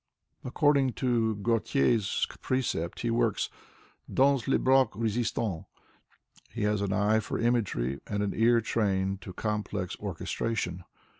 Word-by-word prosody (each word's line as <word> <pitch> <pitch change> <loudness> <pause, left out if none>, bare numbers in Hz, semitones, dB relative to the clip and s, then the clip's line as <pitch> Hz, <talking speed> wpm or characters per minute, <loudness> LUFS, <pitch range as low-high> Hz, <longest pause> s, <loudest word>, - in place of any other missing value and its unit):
According 140 -1 +2
to 115 -4 +1
Gautier's 105 - +1 0.2
precept, 120 -10 -2
he 115 - 0
worts 115 -3 0 0.6
"dans 135 -2 +3
le 135 - +3
bloc 130 -2 +4
rei'tsianl.'' 110 -4 -1 0.8
He 110 +2 -4
has 105 -1 +1
an 100 -1 -1
eye 105 +3 +3
for - - -4
imagery 100 - 0
and 105 0 -1
an 100 - -1
ear 115 +1 +4
trained 95 -3 0
to 95 - -8
complex 105 -2 -3
orchestration. 95 0 -3
110 Hz, 125 wpm, -29 LUFS, 100-120 Hz, 0.8 s, bloc